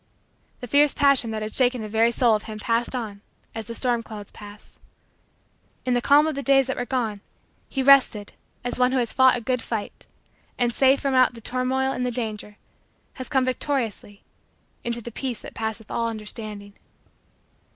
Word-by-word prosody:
The 245 - -6
fierce 285 +3 +4
passion 280 -5 +4
that 215 -1 -3
had 215 - -6
shaken 250 -3 +2
the - - -5
very 225 +2 +2
soul 235 -1 +3
of 210 - -1
him 215 - -6
passed 230 +3 -1
on 210 -5 -5 0.3
as 225 -2 -6
the 230 - -6
storm 240 -1 0
clouds 210 -3 -10
pass. 205 0 -13 1.1
In 250 - +1
the 245 - +1
calm 285 +4 +5
of 315 - -1
the 280 - -4
days 270 -1 +4
that 265 - -2
were 245 - -4
gone, 225 -6 -2 0.5
he 270 - -1
rested 260 -6 +5 0.3
as 245 +1 -3
one 250 +1 +3
who - - +2
has 240 -2 -1
fought 260 -1 +5
a - - -6
good 250 +1 -1
fight 220 -3 -6 0.5
and, 240 -1 +1
safe 270 +2 +4
from 275 -2 -1
out 255 -1 +4
the - - -10
turmoil 255 +3 -1
and 250 - -3
the 250 - 0
danger, 215 -3 -5 0.6
has 255 - -6
come 265 -1 +2
victoriously 250 -6 -3 0.6
into 235 0 -2
the 235 - -8
peace 250 0 -4
that - - -10
passeth 220 -1 -5
all 230 0 -1
understanding. 210 -2 -6
240 Hz, 190 wpm, -24 LUFS, 220-260 Hz, 1.1 s, calm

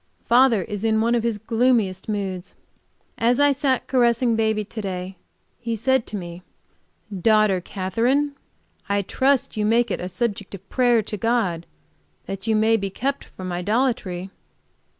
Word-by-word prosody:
Father 240 -4 +4
is 210 0 -6
in 220 -1 +2
one 230 +2 +2
of 240 - +2
his 230 -2 -1
gloomiest 220 -3 +1
moods. 195 -3 -4 0.6
As 240 +3 +2
I 285 0 +5
sat 270 -2 0
caressing 240 -2 +2
baby 220 -1 +1
to 220 +2 -6
day 185 -1 -5 0.4
he 230 -1 -3
said 260 +2 +1
to 210 - -4
me: 175 -1 -8 0.7
"Daughter 210 -1 +3
Katherine, 230 +11 0 0.6
I 200 0 +1
trust 265 +4 +1
you 210 - 0
make 230 +1 +2
it - - -1
a 180 - -4
subject 205 -1 -3
of 195 0 -14
prayer 245 -3 +3
to 210 - -5
God 200 -7 0 0.6
that 195 +2 -6
you 220 - +3
may 220 +1 +3
be 195 -2 -3
kept 270 +8 -3
from 185 -1 -8
idolatry." 190 -1 -1
220 Hz, 155 wpm, -23 LUFS, 195-240 Hz, 0.7 s, I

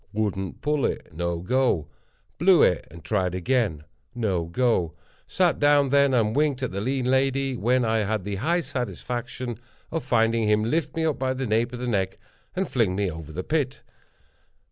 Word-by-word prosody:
Wouldn't 100 -3 -2
pull 150 -2 +1
it—no 85 +1 -4
go. 95 - +1 0.5
Blew 175 0 +6
it, 90 - +2
and 85 -2 -13
tried 90 -1 0
again—no 95 - -2
go. 90 -3 0 0.3
Sat 180 -3 +1
down 145 -1 +4
then, 140 0 +4
and 115 -3 +2
winked 145 -3 +1
at 130 - -1
the 100 +1 -3
lean 130 +3 -1
lady, 135 +1 +1
when 125 +2 +2
I 110 0 +2
had 105 -1 -1
the 100 0 -3
high 170 - +1
satisfaction 120 - -4 0.3
of 165 -1 -2
finding 115 -2 +2
him 105 0 +3
lift 150 +6 -1
me 165 0 0
up 155 -3 0
by 130 0 0
the 130 0 -2
nape 115 +1 +1
of 125 - -6
the 125 - -4
neck, 100 -5 -1 0.4
and 190 0 0
fling 110 -8 +1
me 100 -2 0
over 80 - -7
into - - -10
the 90 - -4
pit. 145 -4 -1
120 Hz, 180 wpm, -25 LUFS, 100-135 Hz, 0.5 s, Blew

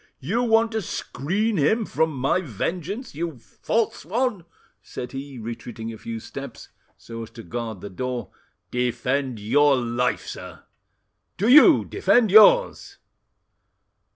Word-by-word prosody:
"You 200 - -1
want 225 -1 +3
to 220 -1 -2
screen 195 - -2
him 215 +10 +2
from 160 -4 0
my 135 +6 0
vengeance, 180 - -4
you 160 -1 -4
false 215 - -2
one!" 215 -1 -1 0.4
said 125 - -8
he, 135 0 -7
retreating 115 0 -7
a - - -9
few 115 -1 -6
steps, - - -9 0.3
so 115 0 -9
as 115 - -8
to 115 - -11
guard 115 -5 -5
the 100 - -7
door. 125 +5 -4 0.4
"Defend 125 +1 -1
your 140 +7 +3
life, 120 0 -1
sir!" - - -9 0.7
"Do 205 - 0
you 280 +5 +7
defend 245 - +2
yours!" - - +5
145 Hz, 130 wpm, -23 LUFS, -, 0.7 s, you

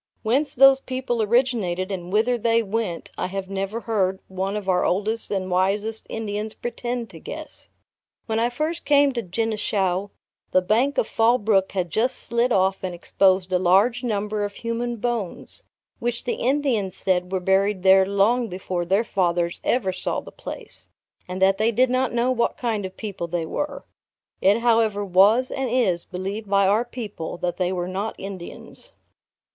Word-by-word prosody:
Whence 270 +6 +2
those 270 +1 +7
people 255 -3 -2
originated, 210 -5 +1
and 180 -2 -5
whither 225 +4 +2
they 230 0 +2
went, 210 -4 -3
I - - -1
have 195 +1 -5
never 195 +4 -3
heard 195 -4 0
one 190 +2 -3
of 205 -2 -6
our 180 -1 +2
oldest 215 +5 0
and 190 -2 -2
wisest 205 +4 0
Indians 215 -1 -4
pretend 240 -2 -4
to 165 - -11
guess. 310 - -9 0.6
When 220 -1 -1
I 235 +1 +2
first 310 +7 -3
came 285 -1 +4
to 240 - -2
Genishau, 200 -2 -1 0.4
the 185 - +4
bank 240 +9 +1
of - - +2
Fall 230 +2 +3
Brook 200 -4 +1
had 180 -4 -2
just 250 +4 +1
slid 235 +1 0
off 190 -2 +2
and 185 -2 -4
exposed 185 +1 +2
a 180 - +3
large 200 +8 +3
number 210 -2 -1
of 205 0 -3
human 235 +1 -3
bones, 230 -4 -4 0.4
which 240 0 -2
the 245 - -1
Indians 250 -8 0
said 180 -1 0
were 190 - 0
buried 190 +1 +1
there 190 0 +7
long 200 +5 +2
before 180 -2 -3
their 195 +6 +2
fathers 175 -5 0
ever 205 -7 +1
saw 180 - -2
the - - -11
place; - - -9 0.4
and 185 +1 -5
that 195 +1 +4
they 220 +2 +3
did 250 +3 +2
not 255 0 +1
know 240 +2 +1
what 235 -2 0
kind 220 -5 -1
of 185 - -16
people 200 -6 -5
they 170 -1 -2
were. 280 - -4 0.6
It 205 +4 +4
however 225 -3 +2
was 200 +7 +4
and 270 -2 -2
is 215 -9 +1
believed 195 +3 -5
by 200 0 +4
our 210 +5 +3
people, 215 -10 -6
that 175 0 -2
they 180 -1 0
were 180 -1 -2
not 195 +4 -3
Indians. 190 -3 -9
210 Hz, 175 wpm, -23 LUFS, 190-235 Hz, 0.6 s, those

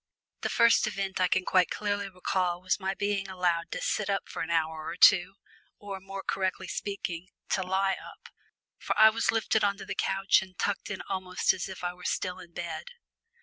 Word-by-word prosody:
The - - -1
first 235 -1 +4
event 195 -2 -3
I 185 - +5
can 185 +1 +1
quite 185 -1 +3
clearly 205 -1 -2
recall 180 -1 -1
was 185 +2 0
my 190 0 -2
being 200 -1 -1
allowed 175 -3 0
to - - -4
sit 210 -2 -1
up 195 -1 -1
for - - -6
an 160 - -3
hour 160 -1 0
or - - -4
two, 180 +1 +6 0.4
or, 200 -2 -7
more 195 +1 -7
correctly 190 -1 -2
speaking, 185 -3 -4 0.2
to 190 - +1
lie 190 +1 +1
up, - - -13 0.5
for - - -2
I 220 +1 +9
was 230 +1 -1
lifted 220 -1 +1
on 200 -1 +2
to 195 - -8
the 195 - -4
sofa 195 0 -1 0.2
and 185 -1 -11
tucked 205 - -1
in 205 - -4
almost 185 -1 +1
as 185 - -5
if 190 -1 -8
I 175 0 -1
were 180 0 -15
still 180 0 -2
in 170 - -12
bed. 170 -2 -5
190 Hz, 205 wpm, -29 LUFS, 180-200 Hz, 0.5 s, I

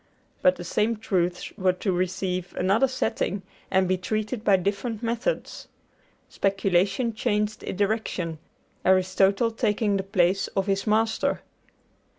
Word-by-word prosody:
But 185 - +5
the 175 - -8
same 215 +6 0
truths 180 -4 -1
were 185 -1 +3
to 190 +2 -2
receive 180 0 -2
another 200 +8 +3
setting 205 -6 -2 0.3
and 190 0 +3
be 185 0 +1
treated 215 +4 -2
by 200 - +5
different 205 +5 -2
methods. 235 - -2 0.6
Speculation 195 +4 +1
changed 210 -1 -1
its - - -5
direction, 195 -6 -1 0.4
Aristotle 190 +4 +3
taking 210 -2 +1
the - - 0
place 190 -1 +2
of 195 -1 +1
his 195 +1 -1
master. 220 +1 +1
195 Hz, 130 wpm, -25 LUFS, 185-215 Hz, 0.6 s, But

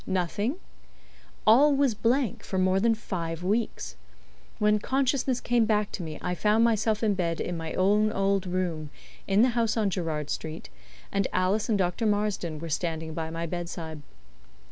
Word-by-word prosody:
Nothing? 195 - -1 0.9
All 275 +7 +6
was 275 -3 +3
blank 235 +2 0
for 190 - -3
more 185 +1 +3
than 225 +2 +3
five 170 -6 -4
weeks. 195 - -1 0.6
When 210 0 +3
consciousness 265 +1 0
came 240 -2 +2
back 210 -1 +1
to - - -5
me 155 -2 -5
I 180 - -1
found 210 +4 +3
myself 220 -1 +2
in 215 -2 +3
bed 170 -3 -1
in 175 - -2
my 165 -1 -5
own 210 +3 +3
old 195 -1 +1
room, 175 -4 -2 0.4
in 200 +3 +4
the 255 - +4
house 230 -2 0
on 210 -3 +1
Gerrard 155 -5 -2
Street, 155 - -5 0.4
and 200 -1 +1
Alice 195 +5 +1
and 215 - +3
Dr. 185 +4 0
Marsden 205 -6 0
were 165 +2 -6
standing 160 0 -2
by 160 0 -3
my 165 +1 -3
bedside. 170 -2 -5
195 Hz, 165 wpm, -27 LUFS, 170-220 Hz, 0.9 s, All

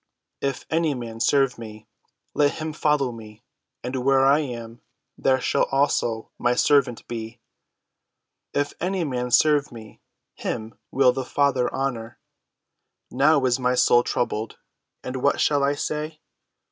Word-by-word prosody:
If 140 -1 -3
any 160 -2 +1
man 115 -2 -7
serve 135 +1 +2
me, 110 -2 -10 0.5
let 145 -1 +2
him 155 0 -5
follow 150 -4 +1
me; 110 -2 -12 0.4
and 125 +2 -4
where 135 +1 +3
I 140 +2 +5
am, 120 -5 -6 0.3
there 130 -1 +2
shall - - +1
also 135 -5 0
my 120 0 +2
servant 130 -3 +2
be: 115 -1 -6 1.1
if 145 0 -1
any 185 +1 -1
man 125 -4 -2
serve 150 +2 +3
me, 110 -3 -12 0.3
him 110 +1 -5 0.2
will 130 -1 +4
the 130 - -3
Father 135 -1 +1
honor. 120 -4 -3 0.9
Now 140 +1 +3
is 125 0 +2
my 125 0 +1
soul 120 -1 +5
troubled; 115 -2 -2 0.5
and 130 +1 -4
what 140 +3 +1
shall 145 -2 +2
I 140 +1 +2
say? 155 +2 -4
130 Hz, 140 wpm, -24 LUFS, 120-145 Hz, 1.1 s, I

